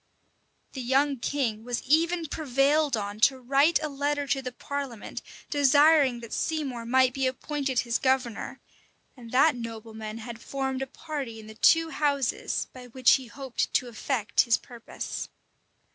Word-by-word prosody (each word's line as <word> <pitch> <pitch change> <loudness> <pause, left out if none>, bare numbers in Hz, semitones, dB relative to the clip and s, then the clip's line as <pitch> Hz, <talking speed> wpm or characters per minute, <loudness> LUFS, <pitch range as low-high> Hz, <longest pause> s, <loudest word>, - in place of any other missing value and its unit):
[*] - - -42
The 265 - -5
young 270 +3 +2
king 230 -4 -2
was 245 0 -3
even 330 +4 +2
prevailed 285 -1 +1
on 205 0 -5
to 265 +4 +4
write 275 +6 +3
a - - 0
letter 285 0 -1
to 270 0 0
the 255 -1 -5
parliament 275 -3 -6 0.3
desiring 285 -2 +5
that 230 - -8
Seymour 270 -7 -2
might 255 +1 +4
be 265 0 0
appointed 265 0 -1
his 235 -1 -1
governor; 260 -3 -1 0.6
and 235 -3 -12
that 275 +3 +4
nobleman 220 -2 -7
had 230 0 -8
formed 265 -1 -3
a 270 - -2
party 275 -6 -6
in 220 - -11
the 220 - -10
two 325 +8 +4
houses, 280 -5 0
by 250 -1 -11
which 255 +1 +3
he 260 -2 -10
hoped 265 0 -3
to 255 - +2
effect 230 -1 0
his 235 -3 +3
purpose. 240 -2 -7
260 Hz, 160 wpm, -27 LUFS, 235-285 Hz, 0.6 s, desiring